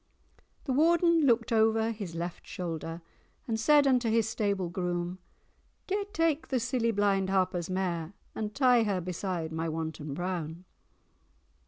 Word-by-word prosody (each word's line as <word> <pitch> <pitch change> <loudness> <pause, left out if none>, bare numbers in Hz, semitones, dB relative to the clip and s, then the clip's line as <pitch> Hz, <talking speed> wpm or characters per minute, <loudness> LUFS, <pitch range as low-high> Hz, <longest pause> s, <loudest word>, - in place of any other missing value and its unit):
The 265 - -1
Warden 335 +1 +4
looked 230 -1 +2
o'er 225 0 +3
his 200 -7 -6
left 170 +1 -5
shoulder, 165 -3 -5 0.4
And 225 -2 -1
said 290 +5 +5
unto 250 -3 +3
his 225 -1 +2
stable 200 -4 -1
groom— 175 0 -3 0.7
'Gae 400 +1 -1
take 330 -4 +1
the 260 - 0
silly 235 0 0
blind 200 -3 +1
Harper's 185 -3 0
mare, 180 -2 -2 0.2
And 215 -1 -4
tie 250 -3 +5
her 205 -4 0
beside 175 -2 -3
my 160 +1 -2
Wanton 155 -2 -4
Brown. 175 -1 -4
200 Hz, 140 wpm, -29 LUFS, 175-235 Hz, 0.7 s, said